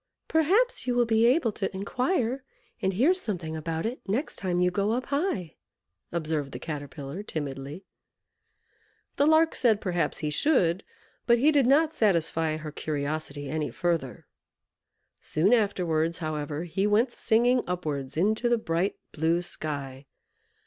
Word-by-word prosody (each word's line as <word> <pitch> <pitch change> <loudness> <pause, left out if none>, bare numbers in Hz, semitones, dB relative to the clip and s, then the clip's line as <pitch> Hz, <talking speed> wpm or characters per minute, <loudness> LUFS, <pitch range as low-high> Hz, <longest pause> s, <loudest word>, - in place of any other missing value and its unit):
"Perhaps 380 - +2
you 245 - +1
will 240 -1 +4
be 225 0 +3
able 250 -2 +3
to 195 -1 -3
inquire 255 - -1 0.4
and 190 - +1
hear 265 - +4
something 180 - -4
about 160 +2 -3
it 240 +3 -3
next 245 +10 -1
time 180 -2 -1
you 180 0 +3
go 200 +4 0
up 250 +2 -1
high," 280 - -2 0.5
observed 155 -4 -2
the - - -4
Caterpillar, 145 +1 -6
timidly. 145 -1 -5 1.3
The 285 - +4
Lark 315 +1 +5
said, 225 -5 +3
"Perhaps 175 -4 -1
he 150 -1 -2
should;" 180 - +2 0.4
but 235 -1 +6
he 285 +6 +4
did 280 -5 +3
not 305 +4 +4
satisfy 165 -6 +1
her 155 -1 -7
curiosity 145 -1 -3
any 155 +1 -2
further. 170 -8 -2 1.0
Soon 180 +9 +2
afterwards, 170 -7 +1
however, 155 -1 -3
he 190 +4 -1
went 225 +4 +3
singing 240 +2 +2
upwards 150 -6 -3
into 215 +7 +2
the 240 - +3
bright, 175 -2 -1 0.2
blue 165 +3 +1
sky. 140 -5 -5
180 Hz, 140 wpm, -27 LUFS, 155-240 Hz, 1.3 s, but